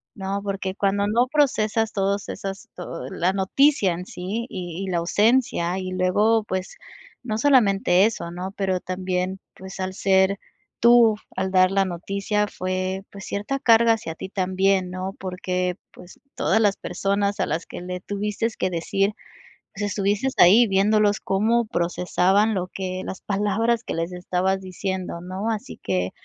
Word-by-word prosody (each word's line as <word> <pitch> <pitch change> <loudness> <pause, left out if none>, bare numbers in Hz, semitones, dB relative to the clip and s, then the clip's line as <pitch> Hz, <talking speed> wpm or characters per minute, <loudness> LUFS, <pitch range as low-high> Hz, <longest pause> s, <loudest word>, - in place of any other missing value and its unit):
¿no? 195 0 -3
Porque 195 -1 -3
cuando 200 0 +1
no 235 +4 +2
procesas 225 -6 +1
todos 200 0 -1
esas 195 0 -6
todo, 165 -7 -7
la 180 +6 0
noticia 200 +3 +3
en 175 +1 -5
sí 195 +6 -4
y 180 0 -5
y - - -5
la 175 -2 0
ausencia 205 -1 +2
y 185 -1 -4
luego, 210 +5 +2
pues, 185 -2 -4 0.4
no 220 -4 -3
solamente 200 -8 +4
eso, 190 -6 -2
¿no? 180 +2 -6
Pero 190 -2 0
también, 185 +1 -3
pues, 190 +1 -10
al 185 0 -3
ser 190 0 +2 0.5
tú, 235 -2 +7 0.2
al 190 0 -2
dar 185 -1 +5
la 195 0 +2
noticia, 200 +4 -2
fue, 185 0 -3
pues, 200 -1 -9
cierta 210 +7 -3
carga 230 -2 +5
hacia 190 -8 -5
ti 190 - -7
también, 190 0 +1
¿no? 185 +1 -4
Porque, 180 -1 -2 0.2
pues, 180 - -15
todas 220 - +1
las 205 -3 +3
personas 200 +2 -1
a - - +2
las 165 +3 -3
que - - -8
le 180 0 -5
tuviste 205 +3 -2
que 185 - -1
decir, 195 +4 0 0.6
pues, 205 - -6
estuviste 205 +5 0
ahí 205 +7 +7
viéndolos 205 +1 +3
cómo 225 +5 +1
procesaban 185 +2 +1
lo 185 -2 -1
que 185 0 -4
las 190 - -6
palabras 210 +3 0
que - - -5
les 165 +2 -2
estabas 180 +2 -1
diciendo, 185 -2 -4
¿no? 185 +4 -4
Así 220 -2 -5
que 90 -1 -1
195 Hz, 160 wpm, -23 LUFS, 185-210 Hz, 0.6 s, tú